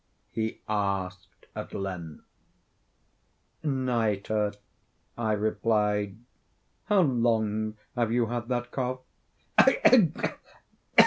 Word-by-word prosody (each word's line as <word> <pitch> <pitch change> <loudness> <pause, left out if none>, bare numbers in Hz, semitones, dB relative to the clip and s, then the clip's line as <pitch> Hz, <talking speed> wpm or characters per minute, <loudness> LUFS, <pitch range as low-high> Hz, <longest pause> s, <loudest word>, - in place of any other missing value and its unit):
he 110 0 -2
asked, 95 -4 -2
at - - -6
length. 90 -5 -5 1.4
"Nitre," 110 -7 0 0.6
I 110 -2 -1
replied. 105 -1 +1 0.7
"How 205 -2 +4
long 110 -6 +1 0.2
have 120 -2 +1
you 120 0 +3
had 120 +1 -3
that 120 -1 -2
cough?" 130 -1 -2 0.6
"Ugh! 240 - +5
110 Hz, 80 wpm, -28 LUFS, 105-120 Hz, 1.4 s, Ugh